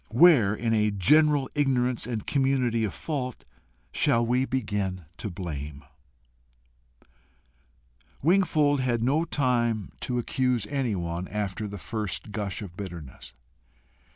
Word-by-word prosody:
Where, 120 - +6
in 115 +1 -1
a 105 -1 +3
general 145 - +4
ignorance 130 -5 +1
and 115 -4 -3
community 130 -4 +1
of 100 - -3
fault, 130 -6 -4 0.5
shall 115 0 +2
we 125 +3 +2
begin 105 -8 -2
to 105 - -4
blame? 75 -5 -6 2.4
Wingfold 155 -4 +3
had 120 -3 0
no 145 +7 +2
time 120 - 0
to 125 - -2
accuse 125 -2 0
anyone 95 -11 -2
after 105 0 -3
the 100 0 -7
first 105 +1 -4
gush 105 -1 -3
of 90 -4 -10
bitterness. 85 -10 -9
115 Hz, 115 wpm, -27 LUFS, 100-130 Hz, 2.4 s, Where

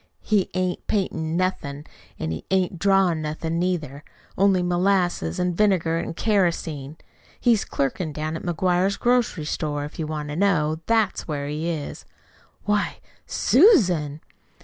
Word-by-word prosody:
"He 205 -3 +1
ain't 185 -1 -2
paintin' 165 -5 -1
nothin', 150 -6 -2 0.3
an' 80 - -3
he 80 - -5
ain't 185 -2 0
drawin' 195 -4 +3
nothin' 160 +2 -3
neither 160 -6 -2 0.3
only 195 -2 +3
molasses 175 - +1
an' 180 0 +1
vinegar 175 -4 +2
an' 165 - -4
kerosene. 165 -8 0 0.4
He's 230 -4 +3
clerkin' 150 +4 -2
down 155 +1 -3
to 165 - -3
McGuire's 180 +2 +1
grocery 240 -10 +1
store, 145 -1 -2
if 150 - -10
you 155 - -2
want 150 -1 -4
to 150 - -4
know. 160 -5 +1
That's 225 -3 +1
where 145 -3 -3
he 155 +3 -2
is." 155 -4 -5 0.6
"Why 210 0 0 0.3
SUSAN!" 180 - +4
175 Hz, 140 wpm, -24 LUFS, 150-195 Hz, 0.6 s, SUSAN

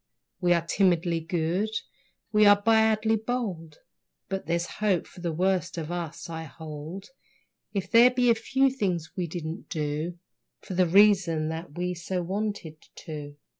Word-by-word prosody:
We 175 -1 +3
are 170 -1 0
timidly 175 -2 +2
good, 175 +4 -1 0.6
we 210 -1 +5
are 205 0 +7
badly 220 0 +3
bold, 210 -9 -4 0.5
But 195 -5 -4
there's 170 +1 0 0.2
hope 195 -5 +2
for 180 - -14
the 170 -1 -1
worst 180 +1 0
of 165 0 -4
us, 170 0 -5
I 160 -1 -6
hold, 160 +5 -8 0.6
If 195 -2 -3
there 235 +2 +8
be 250 -1 +3
a - - +7
few 265 +4 +1
things 180 -10 -2
we 180 -2 -2
didn't 165 +2 -6
do, 155 +2 -3 0.4
For - - -8
the 180 0 +3
reason 180 -4 +4
that 160 -1 -6
we 180 0 -1
so 180 +1 -3
wanted 195 -4 -3 0.3
to. 145 -2 -7
180 Hz, 155 wpm, -27 LUFS, 165-205 Hz, 0.6 s, there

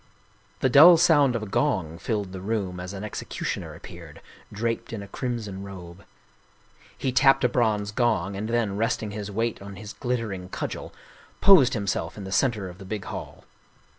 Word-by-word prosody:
The 130 - +3
dull 160 +7 +9
sound 145 -6 +4
of 115 - -2
a - - -3
gong 95 - -1
filled 105 -4 -2
the 95 -1 -7
room 95 -3 -2
as 90 +1 -6
an 100 0 -7
execu 105 - -6
tioner - - -3
appeared, - - -11 0.3
draped 115 +2 -3
in 105 -3 -5
a - - -10
crimson 110 -4 -4
robe. 95 -1 -10 0.9
He 130 - -1
tapped 135 +1 +4
a - - +6
bronze 110 -4 0
gong, 105 -4 0
and 105 +3 -4
then, 115 -4 0
resting 110 -1 -1
his 105 0 -5
weight 115 +2 -2
on 100 0 -9
his 105 +2 -9
glittering 110 -7 -3
cudgel, - - -5 0.5
posed 180 -12 +6
himself 100 -1 -2
in 100 - -6
the 95 - -7
center 105 -1 +1
of 90 +1 -11
the - - -9
big 100 0 -5
hall. - - -7
105 Hz, 180 wpm, -25 LUFS, 95-120 Hz, 0.9 s, dull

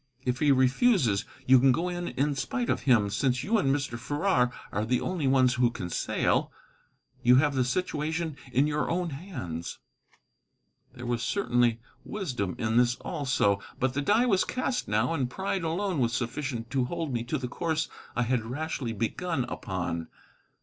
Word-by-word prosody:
If 125 0 0
he 150 -2 +4
refuses, 130 - +3 0.2
you 130 0 +7
can 135 +1 +5
go 170 +8 0
in 175 -1 -3
in 145 +2 0
spite 245 - -1
of - - 0
him, 110 -7 +3
since 125 +4 +1
you 220 +2 +2
and 140 - +1
Mr. 135 -4 -1
Farrar 140 -1 +1 0.2
are 105 - -1
the 125 +3 +1
only 170 -7 -1
ones 130 -1 +4
who 125 -1 +3
can 90 -7 -6
sail. - - 0 0.7
You 125 +1 +6
have 145 +2 +4
the 130 -1 +2
situation 160 +2 -2 0.2
in 135 +3 +3
your 150 0 -1
own 175 0 -1
hands." 130 - -6 1.2
There 120 - -8
was 120 -1 -1
certainly 120 - +1 0.2
wisdom 125 - -3
in 110 0 0
this, 120 0 +4
also. 130 - 0 0.2
But 130 0 +1
the 145 - -1
die 210 - +3
was 195 -6 +3
cast 255 0 -2
now, 110 +8 +1
and 135 -6 -1
pride 190 +5 -2
alone 175 +1 -1
was 115 -2 +1
sufficient 120 0 -3
to 130 -3 +1
hold 165 -1 -3
me 120 -1 -1
to - - -1
the 130 - -4
course 160 +4 -1 0.3
I 125 - +2
had 120 -1 0
rashly 130 -1 -3
begun 130 - -1
upon. 85 -7 -4
130 Hz, 175 wpm, -28 LUFS, 120-165 Hz, 1.2 s, you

